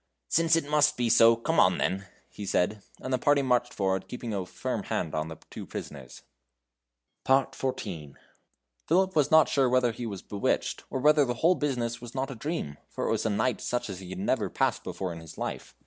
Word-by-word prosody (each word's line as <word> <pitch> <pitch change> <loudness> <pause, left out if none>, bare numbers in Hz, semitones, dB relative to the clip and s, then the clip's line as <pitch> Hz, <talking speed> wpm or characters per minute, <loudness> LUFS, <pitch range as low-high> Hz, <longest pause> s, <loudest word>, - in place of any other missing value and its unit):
"Since 165 0 +4
it 165 -3 0
must 150 0 +3
be 120 -1 +1
so, 115 0 +7
come 115 - 0
on - - +5
then," 95 +1 -1 0.2
he 105 - -9
said; 100 +2 0 0.2
and 130 - -3
the 130 - +2
party 145 +2 +3
marched 125 -1 +1
forward, 95 -1 -1
keeping 120 -2 -5
a 95 -3 -3
firm - - -3
hand 80 - -2
on 80 0 -1
the 80 -1 -8
two - - -7
prisoners. 65 -4 -8 1.0
XIV. 115 - -1 0.7
Phipip 185 +3 +2
was 150 -3 +3
not 160 -1 +6
sure 135 -3 +2
whether 125 -1 +3
he 120 +1 -5
was 100 -4 -6
bewitched, 100 -1 -1
or 130 - -2
whether 150 +2 +5
the 120 -2 -1
whole 165 +9 +4
business 120 -7 -2
was 120 +1 -10
not 135 +1 -2
a - - -6
dream, 110 - -4
for - - -4
it - - 0
was - - 0
a - - +1
night 110 +5 0
such 120 -4 -2
as 95 - -7
he 95 -2 -10
had 95 - -6
never 95 - 0
passed - - 0
before 95 -2 -4
in 85 - -8
his 80 -1 -12
life. - - -5
120 Hz, 210 wpm, -28 LUFS, 95-135 Hz, 1.0 s, so